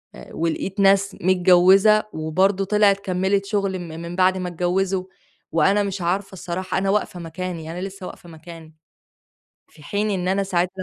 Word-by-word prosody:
آآ، 65 0 -13
ولقيت 170 +4 -3
ناس 195 0 +3
متجوزة 185 +3 +5
وبرضه 185 +5 +1
طِلعت 205 -1 +3
كمّلت 190 +1 0
شغل 200 -2 -1
م 175 - -7
من 170 +2 -7
بعد 185 0 +3
ما 180 -1 -3
اتجوّزوا، 180 +2 -1 0.5
وأنا 195 +6 +3
مش 195 -1 -4
عارفة 190 +3 -2
الصراحة 185 +1 -4
أنا 195 +1 0
واقفة 200 -3 -1
مكاني، 165 -1 -6
أنا 180 +2 -6
لسّه 195 -1 -7
واقفة 175 - -12
مكاني، 160 -1 -13 0.9
في 150 - -19
حين 205 +7 -2
إن 185 -2 -2
أنا 195 +1 +1
ساعت 180 -2 0
185 Hz, 160 wpm, -22 LUFS, 175-195 Hz, 0.9 s, متجوزة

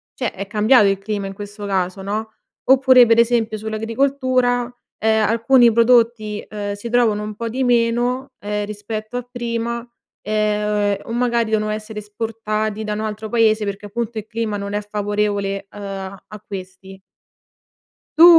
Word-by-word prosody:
cioè 250 - -2
è 195 +1 -6
cambiato 215 +1 +5
il 195 - +2
clima 200 0 -3
in 195 - -6
questo 205 +1 -7
caso 190 0 -1
no, 215 +3 -3 0.3
oppure 260 -2 +6
per 230 0 +4
esempio 230 -2 +2
sull'agricoltura, 245 +2 0 0.2
ehm, 220 -1 +2
alcuni 235 +1 +5
prodotti, 230 -2 +3
ehm, 205 -1 -4
si 205 +3 -7
trovano 230 -3 +2
un 210 0 -5
po' 230 +2 -4
di 255 +4 -2
meno, 245 +2 +1
ehm, 210 0 -2
rispetto 215 +3 -5
a 245 - -5
prima, 235 0 -3 0.4
ehm, 210 -1 +1
o 230 - -7
magari 235 -2 +1
devono 215 -1 +1
essere 215 0 -5
esportati 215 0 -3
da 210 -1 -2
un 210 - -3
altro 215 0 -4
paese 220 -2 +3
perché 200 +1 -5
appunto 230 +1 -4
il 215 - -10
clima 220 -2 -2
non 200 0 -5
è 210 - 0
favorevole, 205 -1 -2
ehm, 205 - -12
a 195 -1 -6
a 210 -1 -10
questi. 190 0 -9 1.2
Tu 330 - +10
215 Hz, 160 wpm, -20 LUFS, 205-235 Hz, 1.2 s, Tu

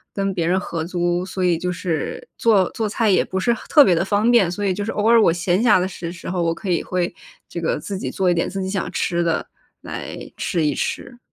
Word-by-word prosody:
跟 195 -1 -1
别 170 -3 -1
人 185 +2 +2
合 165 -4 -4
租， 175 0 -1
所 190 -1 -2
以 170 -2 +2
就 180 0 -2
是， 165 -3 -3
做 205 -5 +4
做 220 -2 -2
菜 225 +2 0
也 - - +4
不 190 - -3
是 235 +5 +2
很 - - -7
特 295 -2 +7
别 180 - +4
地 170 - +1
方 210 +4 +2
便。 210 -8 +5
所 205 +3 -3
以 190 - +2
就 205 +2 -3
是 220 - -3
偶 210 +1 0
尔 230 -1 +6
我 165 - +5
闲 175 +3 0
暇 215 -6 +5
的 180 - 0
时 170 -2 -6
时 170 - -10
候， 180 0 -1
我 165 -1 +1
可 200 - -6
以 170 - +1
会， 180 -1 -2 0.3
这 - - -6
个 - - 0
自 195 -2 -5
己 - - -3
做 185 -2 +1
一 - - +3
点 170 - 0
自 195 -1 -4
己 190 - -3
想 195 0 -2
吃 175 0 0
的， 165 -1 0 0.4
来 - - -6 0.2
吃 170 -6 -1
一 145 - +1
吃。 240 - -4
185 Hz, 285 characters per minute, -21 LUFS, 175-205 Hz, 0.4 s, 特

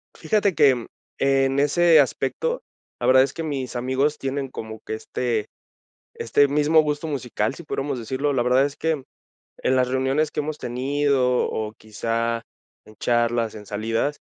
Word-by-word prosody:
Fíjate 205 -3 +1
que 130 -6 +4 0.3
en 135 0 +2
ese 160 +2 +5
aspecto, 145 - 0 0.4
la - - -2
verdad 130 0 +7
es 135 - -3
que 165 - -5
mis 135 -5 -4
amigos 130 +5 0
tienen 135 -1 -3
como 110 -2 -7
que - - -4
este 110 -1 -2 0.7
este 140 +5 +2
mismo 150 +3 +4
gusto 150 +1 -2
musical, 130 -5 -2
si 170 - -10
pudiéramos 140 -3 -3
decirlo. 135 +5 -1
La 125 - +1
verdad 130 +2 +4
es 145 - -4
que 160 -4 -1 0.6
en 130 - +2
las 125 -1 +3
reuniones 135 +4 0
que - - -3
hemos 150 +1 -4
tenido 130 0 +1
o 110 -1 -3
quizá 115 +2 -2 0.4
en 110 - -16
charlas, 120 -1 +1
en 105 -1 -9
salidas, 115 +8 -1
135 Hz, 160 wpm, -23 LUFS, 120-145 Hz, 0.7 s, verdad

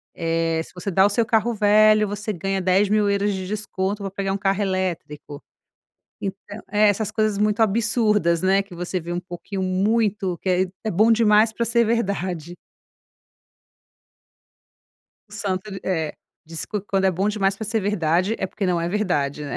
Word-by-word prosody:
Eh, 165 -1 0
se - - -15
você 180 +2 -5
dá 190 +1 +4
o - - +4
seu 220 +3 +1
carro 225 +1 +1
velho, 215 0 +4
você 210 +1 -4
ganha 195 +2 -2
10.000€ 200 +2 +2
de 190 -1 -4
desconto 200 -1 -3
para 195 - -3
pegar 195 0 -2
1 - - -1
carro 195 0 0
elétrico". 175 -6 -4 0.8
Então 200 +1 -6
É 210 +1 +4
essas 210 +1 0
coisas 215 -2 0
muito 210 +1 +1
absurdas, 210 -5 +2
né, 190 +1 +3
que 195 -3 -13
você 175 +2 -3
vê 170 +1 -6
um 175 - -2
pouquinho 185 +2 -6
muito 195 0 0
que - - -5
é 180 0 +3 0.2
é 220 - -1
bom 215 +5 +4
demais 220 -1 +4
para 235 - -1
ser 235 0 +2
verdade. 190 -7 -2 2.7
O - - -19
santo 200 -2 -3
ele 195 -1 -7
É. 160 -5 -1 0.3
Diz: 165 0 -5
"Quan 210 - -4
quando 195 -1 -1
é 190 - +4
bom 190 +3 -1
demais 200 -2 +1
para 220 - -5
ser 225 +1 0
verdade, 185 0 +1
é 190 - -1
porque 195 +1 -4
não 175 -2 +1
é 170 - -1
verdade", 150 -8 -1
né? 140 - -4
195 Hz, 180 wpm, -22 LUFS, 185-210 Hz, 2.7 s, dá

